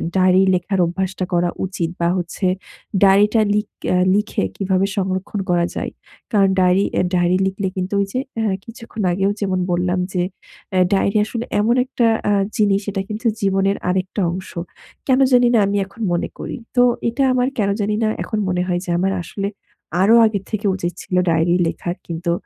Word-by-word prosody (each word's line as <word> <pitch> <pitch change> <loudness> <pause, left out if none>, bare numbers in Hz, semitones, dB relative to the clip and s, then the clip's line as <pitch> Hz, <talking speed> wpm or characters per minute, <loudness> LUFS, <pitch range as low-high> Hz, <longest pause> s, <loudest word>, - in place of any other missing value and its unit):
Diary 185 0 +5
লেখার 190 +2 -1
অভ্যাসটা 185 +2 -2
করা 175 0 +2 0.2
উচিত 180 -3 -3
বা 170 - +2
হচ্ছে 175 +2 -3 0.6
ডায়েরিটা 205 +3 +5
লিক 210 0 0 0.2
অ্যা 180 - +3 0.2
লিখে 210 - 0
কিভাবে 190 0 +1
সংরক্ষণ 190 +1 -2
করা 175 -1 +3
যায়। - - -3 0.4
কারণ 200 -3 +4
ডায়েরি 185 +2 +4
অ্যা - - +1
ডায়েরি 180 0 +3
লিখলে 190 0 -2
কিন্তু 185 +2 -2
ওই - - +1
যে 255 - 0 0.2
আ - - 0 0.2
কিছুক্ষণ 230 -1 -7
আগেও 195 +2 +1
যেমন 190 -2 0
বললাম 180 +1 0
যে 180 - +1 0.6
আ - - +5
ডায়েরি 200 +1 +2
আসলে 230 +2 -4 0.2
এমন 230 +3 +2
একটা 240 -2 +1 0.2
আ - - +4 0.2
জিনিস 200 -1 +3
এটা 195 -1 -2
কিন্তু 215 +3 -2
জীবনের 195 0 +1
আরেকটা 185 +2 -1
অংশ। 185 +1 -6 0.6
কেন 260 -1 +4
জানি 245 0 +6
না 230 - +5
আমি 200 +1 0
এখন 195 +4 -14
মনে 175 - -1
করি। - - -5 0.2
তো 245 - +5 0.3
এটা 275 +4 0
আমার 250 0 +2
কেন 200 -2 +2
জানি 210 +1 0
না - - +2 0.2
এখন 215 - -3
মনে 180 0 0
হয় 175 -1 0
যে - - -8
আমার 195 +1 +1
আসলে 200 +3 -4 0.5
আরও 220 +4 +6
আগে 215 -2 0
থেকে 215 -1 -3
উচিত 175 -2 -3
ছিল, 180 - -4
ডায়েরি 165 +1 +2
লেখা 175 +1 -3 0.2
কিন্তু 170 +1 -2
195 Hz, 180 wpm, -20 LUFS, 180-210 Hz, 0.6 s, জানি